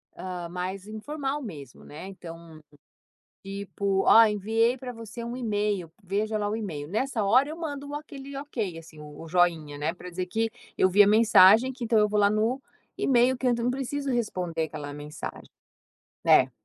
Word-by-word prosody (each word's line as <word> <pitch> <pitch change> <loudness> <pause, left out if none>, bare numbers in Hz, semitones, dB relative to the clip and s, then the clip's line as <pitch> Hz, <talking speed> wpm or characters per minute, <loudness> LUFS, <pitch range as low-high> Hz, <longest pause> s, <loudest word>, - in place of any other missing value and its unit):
ah, 180 -2 -6
mais 185 +3 -5
informal 275 +6 -4
mesmo, 145 - -9
né, 155 +6 -9
então, 165 -4 -11 0.8
tipo 195 0 -2
ó 225 0 +9
enviei 225 +4 +1
para 250 -1 -7
você 230 0 -8
um 235 +1 -5
e-mail, 205 -7 -1
veja 210 +3 -1
lá 205 0 -1
o 215 - -1
e-mail, 160 -10 -5
nessa 220 +2 -1
hora 255 +8 +4
eu 315 - -6
mando 290 -3 -5
aquele 280 -2 -8
"ok" 230 - -4
assim 160 -1 -14
o 150 -1 -11
o 165 - -9
joinha 165 -4 +1
não 150 - -3
é 165 - 0
para 180 0 -10
dizer 180 +1 -3
que 225 +4 -1 0.3
eu 185 - +3
vi 205 +3 +7
a 200 - +4
mensagem 220 +2 +6
que 250 -2 -6
então 225 -1 +3
eu 210 - +5
vou 210 0 +1
lá 200 - +5
no 225 +5 0 0.4
e-mail 250 0 +3
que 260 - -2
ent 240 - +1
não 235 +1 0
preciso 275 +1 -3
responder 180 -8 -1
aquela 150 -2 -7
mensagem, 150 +1 -8 0.8
né? 130 - +5
210 Hz, 185 wpm, -27 LUFS, 180-245 Hz, 0.8 s, ó